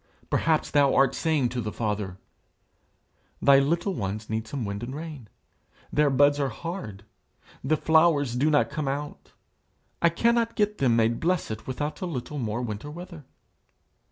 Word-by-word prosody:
Perhaps 160 -1 +1
thou 145 -2 +4
art 135 -1 +4
saying 155 -7 +1
to 125 0 -3
the 105 -1 -4
Father, 105 -4 -3 1.2
"Thy 140 -1 +6
little 170 +7 0
ones 105 - -4
need 110 0 -2
some 125 -1 -4
wind 100 0 -4
and 125 +3 -5
rain: 150 -8 -8 0.6
their 150 -1 +4
buds 145 +2 +4
are 140 -2 +1
hard; 115 - -7 0.6
the 155 +4 +2
flowers 160 -5 +3
do 140 +5 +2
not 145 -2 +2
come 150 -2 -3
out. 145 +2 -5 0.7
I 170 - +5
cannot 230 +6 +1
get 210 -1 0
them 125 -4 +3
made 115 0 +2
blessed 165 - -1
without 145 +7 -4
a 185 - -2
little 150 -1 -5
more 115 0 -2
winter 110 +4 -5
weather." 170 -1 -9
140 Hz, 155 wpm, -26 LUFS, 115-160 Hz, 1.2 s, Thy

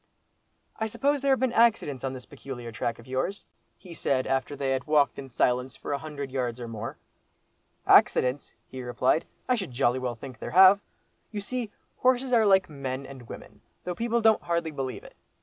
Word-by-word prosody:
"I 220 - -1
suppose 280 +5 0
there 275 0 +2
have 265 - +3
been 260 -2 +1
accidents 225 - +2
on 135 -1 -2
this 130 -1 -8
peculiar 130 -4 -8
track 115 +1 -2
of 115 - -14
yours?" 130 +10 -3 0.3
he 180 -2 -12
said, 135 -5 0
after 135 +2 -1
they 135 -1 -1
had 130 -1 -1
walked 150 -2 +3
in 135 -1 -8
silence 125 +1 0
for - - -5
a 140 - -1
hundred 145 -3 -6
yards 125 -2 -2
or 120 - -5
more. 115 0 -6 0.9
"Accidents!" 130 +2 +4
he 130 - -8
replied, 125 +4 +1 0.2
"I 255 - +3
should 215 - -2
jolly 125 0 +1
well 125 -2 -3
think 125 0 -10
there - - -5
have. 190 +2 +8 0.5
You 210 - -5
see, 235 +2 -3 0.3
horses 255 0 +2
are 225 -3 +5
like 190 -1 +5
men 135 -2 -5
and 130 -3 -11
women, - - -11 0.2
though 180 - -3
people 235 +4 0
don't 220 -1 +4
hardly 170 -1 -1
believe 135 -3 -5
it. - - -14
140 Hz, 195 wpm, -27 LUFS, 130-205 Hz, 0.9 s, have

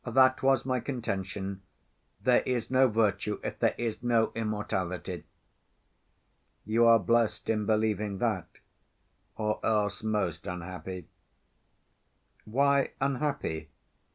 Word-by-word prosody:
That 130 +1 +4
was 135 -2 +3
my 130 -1 0
contention. 100 -6 -4 0.6
There - - +4
is 125 -1 -2
no 130 0 +5
virtue 105 -2 0
if - - -4
there - - +2
is 115 -2 -3
no 115 -2 +2
immortality." 105 -5 -3 1.4
"You 115 +3 +4
are 115 0 +8
blessed 115 +2 +1
in 105 -2 -1
believing 105 -2 +1
that, 105 -5 -1 0.9
or 105 -1 -1
else 105 -2 +1
most 100 -7 -1
unhappy." 90 +1 -6 1.4
"Why 140 +4 +2
unhappy?" 135 - -1
110 Hz, 105 wpm, -29 LUFS, 100-120 Hz, 1.4 s, are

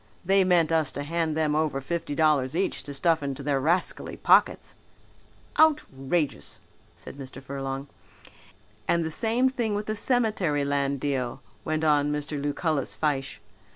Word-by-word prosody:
They 195 +1 +4
meant 175 -3 +3
us 160 -4 +2
to 145 - -4
hand 160 0 -1
them 155 -1 +1
over 155 -3 0
fifty 145 +1 -3
dollars 150 -4 +2
each 190 +3 -1
to 145 - -6
stuff 165 +2 +2
into 140 0 -4
their 140 -1 +1
rascally 170 +7 -1
pockets." - - +3 0.9
"Outrageous!" 155 - +1 0.4
said - - -11
Mr. 135 -1 -9
Furlong. 135 0 -5 1.0
"And 170 -1 +2
the 160 - -3
same 235 +8 +1
thing 235 -5 -1
with 205 +1 -3
the 215 - -2
cemetery 210 - +1
land 140 -1 0
deal," 135 -2 -2 0.2
went 155 0 -1
on 150 -1 +3
Mr. 150 0 -3
Lucullus 145 0 -1
Fyshe. 140 -3 -1
150 Hz, 150 wpm, -26 LUFS, 140-170 Hz, 1.0 s, They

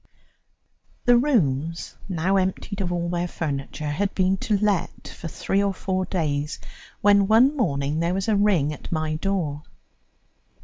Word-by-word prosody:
The 245 - +6
rooms, 170 - +1
now 185 +2 +1
emptied 190 +2 -2
of 180 -2 -2
all 175 -1 -1
their 175 0 -1
furniture, 150 -2 -4
had 195 +6 -1
been 190 0 +2
to 205 +3 0
let 205 -3 -1
for - - -8
three 195 +4 -1
or 200 -1 0
four 185 0 -1
days 150 -4 -2 0.4
when 200 -1 +5
one 245 +7 +5
morning 145 - 0
there 170 +2 0
was 195 +2 -2
a 220 - +3
ring 190 -8 +2
at - - -10
my 155 -1 -1
door. 160 -5 -2
185 Hz, 150 wpm, -24 LUFS, 155-200 Hz, 0.4 s, The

